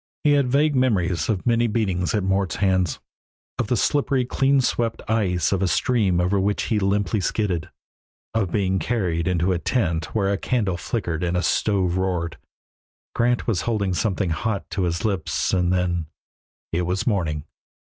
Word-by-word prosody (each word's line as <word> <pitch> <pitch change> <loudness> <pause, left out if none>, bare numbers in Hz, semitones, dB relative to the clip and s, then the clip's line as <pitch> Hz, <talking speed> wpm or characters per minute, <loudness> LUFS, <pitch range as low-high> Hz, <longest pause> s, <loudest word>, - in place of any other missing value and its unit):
He 150 - +4
had 140 -2 +3
vague 145 +3 +2
memories 90 -11 +1
of 100 -5 -1
many 120 -1 +3
beatings 100 -5 0
at 105 - 0
Mort's 95 0 0
hands, 95 -4 +1 0.6
of 120 - 0
the 125 - +1
slippery 135 +1 +1
clean 135 +2 +2
swept 120 -3 -1
ice 100 -6 +1
of 100 -2 0
a 95 - +2
stream 95 0 +2
over 90 +3 +2
which 100 +2 0
he 110 - 0
limply 100 +1 +1
skidded, 90 -4 -1 0.6
of 100 -6 0
being 95 -1 +1
carried 90 -5 -1
into 90 0 +1
a 90 - 0
tent 85 -4 0
where 100 -2 +2
a 100 - -2
candle 105 -8 0
flickered 85 -5 -3
and 90 0 0
a 90 - 0
stove 95 -4 +1
roared. 90 -3 -2 0.7
Grant 120 +1 +1
was 100 -8 0
holding 100 -3 -1
something 95 -2 0
hot 100 +4 -2
to 95 -2 0
his 85 +5 -2
lips, 100 -4 -1
and 90 -1 +2
then 90 -3 0 0.6
It 85 - 0
was 95 +1 -1
morning. 80 - -1
95 Hz, 170 wpm, -23 LUFS, 90-115 Hz, 0.7 s, He